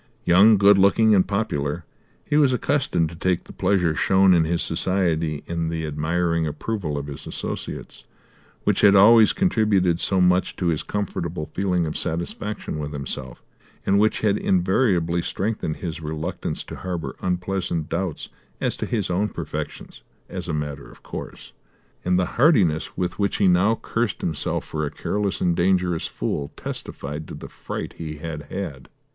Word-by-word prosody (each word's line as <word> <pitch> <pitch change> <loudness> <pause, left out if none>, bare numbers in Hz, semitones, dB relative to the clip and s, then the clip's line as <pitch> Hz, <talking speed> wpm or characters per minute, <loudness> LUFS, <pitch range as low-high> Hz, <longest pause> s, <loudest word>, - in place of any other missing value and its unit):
Young, 100 +5 +7
good 100 0 +6
looking 110 +3 +5
and 95 -3 +4
popular, 80 -7 -2 0.4
he - - -1
was 145 -4 +5
accustomed 125 - +1
to 85 - -10
take 90 +1 0
the - - -13
pleasure 90 -5 +2
shown 95 +3 +4
in 85 -2 +4
his 85 +1 0
society 80 -5 0
and 85 -1 -2
the 80 -1 -3
admiring 80 +2 0
approval 75 0 -3
of 70 - -4
his 70 -1 -8
associates, - - -6 0.6
which - - +2
had 100 -1 +7
always 110 +3 +7
contributed 105 - +2
so 95 0 +1
much 90 0 +3
to 90 - 0
his 80 -3 0
comfortable 85 -6 -4
feeling 90 -3 +1
of 75 - -4
satisfaction 85 +2 -3
with 75 0 -4
himself, 65 -2 -6 0.4
and 100 +1 +3
which 110 +1 +2
had 105 -2 +2
invariably 90 -2 +2
strengthened 95 -4 -2
his 80 -3 -5
reluctance 80 +3 -4
to - - -9
harbour 90 -3 -4
unpleasant 90 -3 -1
doubts 90 -2 -3 0.3
as - - 0
to - - -3
his 105 -6 -1
own 100 +4 +1
perfections, - - -6 0.3
as - - -5
a - - -2
matter 75 -2 -4
of - - -17
course; - - -8 0.5
and 90 0 +2
the 90 - +2 0.2
heartiness 95 - +3
with 90 +1 -2
which 100 -1 +1
he 100 - +3
now 90 +5 +4
cursed 115 -3 -2
himself 80 -3 -1
for 75 0 -3
a 75 - -1
careless 100 +4 -2
and 85 -1 +2
dangerous 90 -1 +1
fool 70 -1 -3
testified 75 +2 -6
to - - -7
the - - -8
fright - - -6
he 80 -2 -5
had 75 -2 -7
had. 75 -10 -5
90 Hz, 165 wpm, -23 LUFS, 80-100 Hz, 0.6 s, Young